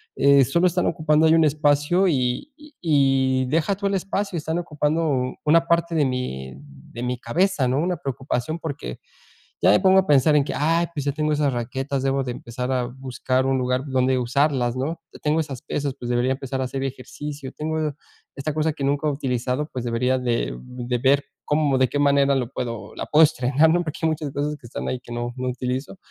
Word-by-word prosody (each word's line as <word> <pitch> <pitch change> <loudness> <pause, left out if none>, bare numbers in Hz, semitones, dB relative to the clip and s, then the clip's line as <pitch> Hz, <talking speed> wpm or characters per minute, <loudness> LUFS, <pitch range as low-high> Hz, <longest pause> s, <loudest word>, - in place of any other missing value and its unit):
eh, 140 0 +5
sólo 170 +8 +2
están 180 +1 0
ocupando 155 -1 +3
ahí 160 - +5
un 165 -1 +5
espacio 150 +5 +2
y 130 - 0
y 300 0 -16
y 135 -4 +2
deja 165 +8 +1
tú 200 +1 -6
el 200 - -1
espacio, 195 +1 -2
están 160 +1 -2
ocupando 150 -5 -1
una 165 +2 +4
parte 170 0 +1
de 150 -3 +3
mi 95 - -3
de 70 - -11
mi 125 0 -2
cabeza, 160 +3 +1
¿no?, 130 +2 +1
una 175 +2 0
preocupación 135 +2 -3
porque 140 - -5 0.6
ya - - +6
me 105 - +5
pongo 190 0 +5
a 190 - +1
pensar 145 +1 +4
en 145 - +4
que, 140 - -4
"Ay, 165 +3 +2
pues 145 -4 -4
ya 140 - 0
tengo 155 +1 -1
esas 145 -2 +1
raquetas, 130 +3 -3
debo 135 0 +1
de 125 - -3
empezar 125 +2 -5
a 125 -1 0
buscar 130 0 -2
un 135 0 +2
lugar 125 0 0
donde 130 -1 +1
usarlas", 125 0 +1
¿no? 145 +6 -3 0.2
"Tengo 150 +2 +2
esas 140 -6 -4
pesas, 140 -2 -3
pues 120 - -5
debería 125 +2 +1
empezar 135 0 -4
a - - 0
hacer 135 +1 -4
ejercicio. 135 +1 -6
Tengo 155 -1 -2 0.4
esta 145 +2 -3
cosa 155 +1 0
que 145 - -6
nunca 145 +2 +1
he - - +2
utilizado, 130 +1 -2
pues, 125 -2 -5
debería 125 +2 +1
de 120 - -1
de 125 - -4
ver 135 +3 +3 0.2
cómo 150 -2 +2
de 130 0 +3
qué 145 - -2
manera 140 -1 +4
lo 125 -2 -2
puedo, 115 -4 -5
la - - -4
puedo 155 +1 +6
estrenar", 145 +1 +3
¿no?, 175 +2 +3
porque 155 -2 -6
hay 160 - +3
muchas 155 -2 -3
cosas 145 +1 -2
que 125 - -13
están - - -5
ahí 130 - -2
que 120 -1 -10
no, 120 0 -3
no 130 0 -3
utilizo. 125 +6 -4
140 Hz, 210 wpm, -23 LUFS, 125-155 Hz, 0.6 s, ya